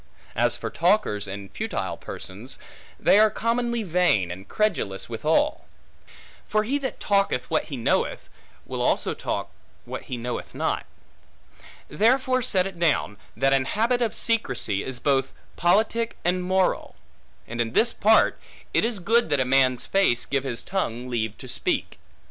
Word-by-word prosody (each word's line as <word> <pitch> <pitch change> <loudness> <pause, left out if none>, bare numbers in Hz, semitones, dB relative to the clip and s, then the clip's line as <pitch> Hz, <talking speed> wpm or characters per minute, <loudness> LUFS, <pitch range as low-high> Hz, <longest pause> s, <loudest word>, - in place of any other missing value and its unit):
As - - +3
for - - -5
talkers 170 - +1
and 100 0 -7
futile 220 +1 -3
persons, - - -8 0.4
they 200 - +5
are 215 0 +6
commonly 235 +1 -1
vain 170 - +2
and 95 +2 -8
credulous 170 - -1
withal. 155 - +1 0.8
For 215 0 +1
he 270 +6 0
that 265 -2 -4
talketh 200 -11 +1
what 160 - +1
he 140 - -6
knoweth, 115 - 0 0.4
will - - -4
also - - +1
talk - - -4 0.3
what - - -6
he 125 - -4
knoweth 120 +1 -5
not. - - -1 1.0
Therefore 255 +4 +2
set 190 -7 +2
it 190 -3 -7
down, 150 -11 +1 0.2
that 135 0 +3
an 135 -1 +2
habit 235 - +1
of 230 -3 0
secrecy, 160 - 0
is 130 -2 -3
both 135 -2 +1 0.2
politic 220 +6 +2
and 180 +1 +1
moral. 185 0 0 0.5
And 120 +1 -2
in 115 0 -2
this 235 - +4
part, 220 +2 +4 0.3
it - - +3
is 230 -1 -1
good 225 +6 +2
that 145 - +2
a 130 - +2
man's 130 -1 +3
face 190 -12 +2
give 135 -1 -1
his 120 -3 -4
tongue 125 -10 -3
leave 110 -3 -2
to - - -10
speak. - - -2
175 Hz, 155 wpm, -25 LUFS, -, 1.0 s, are